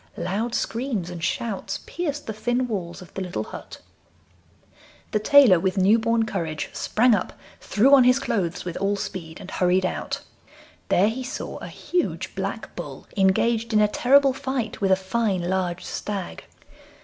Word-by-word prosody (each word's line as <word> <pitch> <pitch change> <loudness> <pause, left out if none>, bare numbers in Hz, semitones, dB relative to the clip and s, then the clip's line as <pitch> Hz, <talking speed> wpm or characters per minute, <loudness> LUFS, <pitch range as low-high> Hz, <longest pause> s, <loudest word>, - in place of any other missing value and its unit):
Loud 220 +5 -2
screams 225 -8 -2
and 170 -2 -7
shouts 200 -2 -2
pierced 295 -4 -3
the 220 - -4
thin 245 +4 0
walls 185 -5 -4
of 180 - -17
the 195 - -4
little 175 -12 -3
hut. - - -10 1.3
The 215 - +1
tailor, 225 -5 +7
with 190 +2 -1
new 200 +5 +5
born 230 0 +1
courage, 165 -8 -3
sprang 240 +2 +3
up, 195 - -1 0.3
threw 255 +7 +3
on 270 -2 +8
his 250 +1 +5
clothes 185 -12 -2
with 175 -1 -4
all 200 +1 +1
speed 165 -5 -6
and 190 - -9
hurried 185 +1 +2
out. - - -3 0.7
There 200 +4 +4
he 255 +4 -4
saw 255 +4 -5
a - - -7
huge 360 -1 -2
black - - -5
bull - - -7
engaged 225 +4 +2
in 215 - +5
a 210 - +5
terrible 270 +5 +4
fight 260 -5 -3
with 195 -1 +2
a - - +7
fine 190 -1 -1
large 180 -1 -1
stag. 200 -4 -5
210 Hz, 165 wpm, -24 LUFS, 185-245 Hz, 1.3 s, on